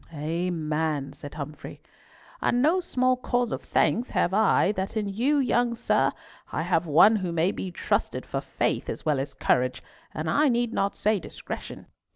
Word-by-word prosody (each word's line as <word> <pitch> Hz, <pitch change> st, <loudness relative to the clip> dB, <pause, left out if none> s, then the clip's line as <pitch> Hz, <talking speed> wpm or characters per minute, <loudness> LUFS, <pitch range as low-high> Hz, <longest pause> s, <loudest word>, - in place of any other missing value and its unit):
"Amen," 155 Hz, -2 st, -2 dB
said 145 Hz, 0 st, -10 dB
Humfrey. 150 Hz, 0 st, -7 dB, 0.6 s
"And 245 Hz, -, +2 dB
no 315 Hz, +8 st, +3 dB
small 255 Hz, -7 st, +1 dB
cause 245 Hz, -1 st, -1 dB
of -, -, -3 dB
thanks 240 Hz, +3 st, +1 dB
have 175 Hz, -, +1 dB
I 210 Hz, -1 st, +4 dB
that 195 Hz, +1 st, -3 dB
in 210 Hz, -2 st, -1 dB
you, 245 Hz, +9 st, +1 dB
young 245 Hz, -3 st, +2 dB
sir, 230 Hz, -, +2 dB, 0.4 s
I 160 Hz, -, -1 dB
have 170 Hz, -1 st, +1 dB
one 180 Hz, +9 st, +6 dB
who 185 Hz, -4 st, -3 dB
may 170 Hz, +3 st, +1 dB
be 190 Hz, -, -5 dB
trusted 175 Hz, -, -1 dB
for -, -, -3 dB
faith -, -, -2 dB
as -, -, -5 dB
well 150 Hz, -3 st, +2 dB
as 140 Hz, +1 st, -4 dB
courage, 125 Hz, 0 st, +1 dB, 0.3 s
and 155 Hz, +1 st, -4 dB
I 290 Hz, -, +3 dB
need 240 Hz, -1 st, 0 dB
not 200 Hz, 0 st, 0 dB
say 215 Hz, -1 st, +1 dB
discretion." -, -, -8 dB
190 Hz, 175 wpm, -26 LUFS, 155-240 Hz, 0.6 s, one